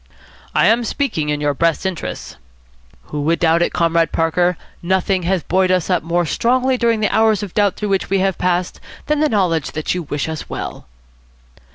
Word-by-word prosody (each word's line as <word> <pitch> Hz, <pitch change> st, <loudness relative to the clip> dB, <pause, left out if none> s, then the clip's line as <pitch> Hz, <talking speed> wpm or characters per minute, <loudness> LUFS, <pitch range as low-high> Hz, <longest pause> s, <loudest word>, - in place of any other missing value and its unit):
"I -, -, +4 dB
am 230 Hz, +3 st, +3 dB
speaking 220 Hz, -, -2 dB
in 150 Hz, 0 st, -1 dB
your 145 Hz, -1 st, +1 dB
best 165 Hz, +5 st, 0 dB
interests." 190 Hz, -3 st, -5 dB, 0.8 s
"Who 150 Hz, -, -2 dB
would 165 Hz, +3 st, +1 dB
doubt 165 Hz, 0 st, +2 dB
it, -, -, +1 dB
Comrade 165 Hz, -1 st, +1 dB
Parker. 170 Hz, +2 st, +1 dB, 0.2 s
Nothing 190 Hz, +1 st, +1 dB
has 190 Hz, -3 st, +1 dB
buoyed 185 Hz, 0 st, +1 dB
us 185 Hz, 0 st, +1 dB
up 180 Hz, -, +2 dB
more 170 Hz, +1 st, 0 dB
strongly 255 Hz, -, +1 dB
during 230 Hz, -3 st, +1 dB
the 210 Hz, -, +1 dB
hours 220 Hz, -2 st, +3 dB
of 195 Hz, -, -7 dB
doubt 205 Hz, -3 st, +2 dB
through 210 Hz, -, -4 dB
which 195 Hz, -1 st, 0 dB
we 195 Hz, -, +2 dB
have 190 Hz, -1 st, 0 dB
passed 180 Hz, 0 st, -1 dB, 0.3 s
than 300 Hz, 0 st, 0 dB
the 305 Hz, 0 st, +2 dB
knowledge 175 Hz, -8 st, 0 dB
that 155 Hz, 0 st, -2 dB
you 180 Hz, -, -2 dB
wish 145 Hz, -2 st, -3 dB
us 160 Hz, -1 st, -6 dB
well." -, -, -6 dB
180 Hz, 195 wpm, -18 LUFS, 165-205 Hz, 0.8 s, I